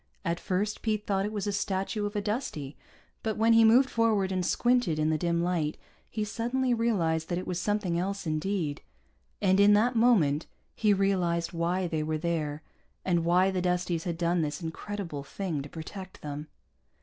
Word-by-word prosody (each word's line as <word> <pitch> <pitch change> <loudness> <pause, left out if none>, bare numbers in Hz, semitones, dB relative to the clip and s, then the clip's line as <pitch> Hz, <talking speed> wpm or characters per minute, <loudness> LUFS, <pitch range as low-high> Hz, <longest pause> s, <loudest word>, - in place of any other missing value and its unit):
At 170 0 0
first 200 +3 -1
Pete 215 -2 -1
thought 195 0 0
it - - -5
was 210 -2 -3
a 205 - 0
statue 205 +1 -1
of 205 - -8
a 205 - 0
Dustie, 200 - -3 0.5
but 220 -2 -2
when 225 +1 +4
he 225 0 +7
moved 240 +4 +6
forward 220 -6 +1
and 185 -1 0
squinted 240 -5 +2
in 155 0 +1
the 155 - +1
dim 170 0 +1
light, 170 -4 0 0.3
he 215 - -2
suddenly 240 +4 0
realized 170 -9 0
that 175 - 0
it 180 - -4
was 180 0 -2
something 200 -4 0
else 195 +2 -3
indeed. 155 -1 -1 0.6
And 190 0 +4
in 205 +1 +7
that 235 +4 +3
moment 185 -11 +3 0.3
he 215 -2 +2
realized 180 -4 +1
why 175 +2 0
they 160 -3 -1
were 155 0 -1
there 155 -2 -2 0.4
and 175 -3 +2
why 180 +3 +3
the 185 -1 -1
Dusties 180 -2 0
had 170 -2 -2
done 170 0 +1
this 150 -1 -2
incredible 170 -1 -5
thing 160 +1 -4
to 140 - -8
protect 185 +4 -9
them. 150 +1 -5
185 Hz, 185 wpm, -29 LUFS, 165-210 Hz, 0.6 s, he